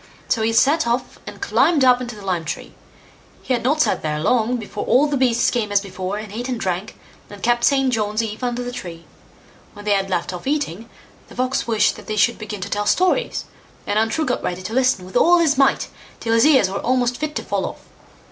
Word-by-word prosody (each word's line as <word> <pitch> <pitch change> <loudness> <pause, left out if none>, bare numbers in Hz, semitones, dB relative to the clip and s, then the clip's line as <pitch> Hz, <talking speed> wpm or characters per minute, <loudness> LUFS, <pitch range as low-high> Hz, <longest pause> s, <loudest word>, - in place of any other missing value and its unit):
So 225 - +1
he 220 +1 +1
set 280 +5 +3
off 240 +2 -2
and - - -8
climbed 300 -6 +3
up 250 0 +5
into 240 -2 -6
the 205 -2 -11
lime 180 -3 -1
tree. 160 - -6 0.7
He 260 - -1
had 240 - 0
not 300 +5 +1
sat - - +1
there 150 -1 -2
long, 240 +8 +1
before 210 -2 -6
all 270 +4 +4
the 290 -1 -1
beasts 245 -3 +2
came 220 -4 -1
as 205 - +4
before, 190 0 -5
and 210 -1 -8
ate 245 +4 -4
and 245 -3 -2
drank, 190 +3 -3 0.3
and 205 -1 -12
kept 240 0 +2
St. 270 -1 +3
John's 215 0 0
eve 220 +2 -6
under 245 0 -2
the 245 - -5
tree. 170 -8 -8 0.7
When 205 0 -12
they 210 - +1
had 195 -1 +1
left 180 0 -2
off 180 +7 -7
eating, 235 - -2 0.4
the - - -14
Fox 255 0 -1
wished 225 -2 +2
that - - -13
they 215 - -2
should 230 +3 +2
begin 210 -2 -6
to 200 - -4
tell 205 0 -1
stories, 370 +7 +1 0.4
and 210 - +1
Untrue 225 +9 0
got 250 - -1
ready 180 +1 -4
to 215 - -5
listen 255 -7 +2
with 185 - -13
all 350 +1 +5
his 325 -4 +3
might, 270 0 +2 0.3
till 225 - -1
his 230 +5 +5
ears 265 -10 +5
were 195 +1 -4
almost 250 -1 0
fit 305 0 -4
to - - -3
fall - - -2
off. - - -9
230 Hz, 235 wpm, -21 LUFS, 205-255 Hz, 0.7 s, up